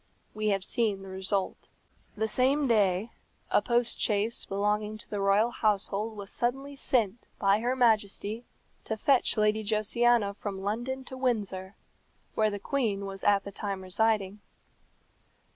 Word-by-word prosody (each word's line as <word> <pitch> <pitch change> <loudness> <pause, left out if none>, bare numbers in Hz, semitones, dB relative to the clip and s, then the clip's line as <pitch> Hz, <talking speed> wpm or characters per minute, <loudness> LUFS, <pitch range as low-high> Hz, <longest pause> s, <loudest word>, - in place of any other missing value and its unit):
We 215 0 -2
have 195 -2 +1
seen 210 -5 +1
the 195 - -9
result. 190 +1 -2 0.5
The 220 +1 0
same 270 +5 +2
day 205 -2 +2 0.4
a - - +4
post 240 -1 0
chaise 215 +2 0
belonging 210 +2 -1
to - - -7
the 205 - -4
royal 200 +4 +3
household 210 0 0
was 200 -1 -6
suddenly 270 +4 -2
sent 235 -5 0
by 195 +1 +3
her 245 +3 0
Majesty 220 -2 +1 0.4
to 220 - -3
fetch 260 0 +2
Lady 215 0 +2
Josiana 215 0 +2
from 200 -2 -5
London 240 +6 -2
to 260 - -8
Windsor, 205 -7 -2 0.6
where 215 -1 +2
the 205 - -4
queen 205 -4 -1
was 195 0 -6
at 200 -1 +4
the 200 - -7
time 195 -1 -4
residing. 205 +1 0
215 Hz, 145 wpm, -29 LUFS, 200-235 Hz, 0.6 s, a